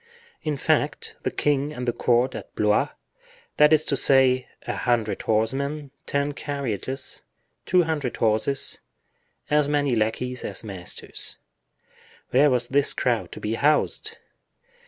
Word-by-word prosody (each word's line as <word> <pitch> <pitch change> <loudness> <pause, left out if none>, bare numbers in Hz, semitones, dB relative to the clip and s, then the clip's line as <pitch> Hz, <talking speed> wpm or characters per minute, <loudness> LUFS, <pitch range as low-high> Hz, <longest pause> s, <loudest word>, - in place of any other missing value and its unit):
In 150 -2 -2
fact, - - 0
the - - -1
king 145 0 0
and 125 -4 -6
the 120 - +1
court 120 +1 +2
at - - -9
Blois, 105 0 +2 0.7
that 150 0 +6
is 155 -1 +5
to 140 - 0
say, 130 -1 +4 0.2
a - - -3
hundred 115 -3 0
horsemen, 135 +7 -1 0.2
ten 140 +1 0
carriages, 135 -3 -3 0.5
two 180 0 +4
hundred 150 -7 -2
horses, 110 +5 +1 0.7
as 150 -1 +3
many 145 -3 +1
lackeys 115 +3 -1
as - - -5
masters—where 110 +7 -3
was 125 -2 0
this 140 +1 +4
crowd 120 -3 0
to - - -8
be 105 - -2
housed? 145 +5 +1
130 Hz, 130 wpm, -24 LUFS, 120-145 Hz, 0.7 s, that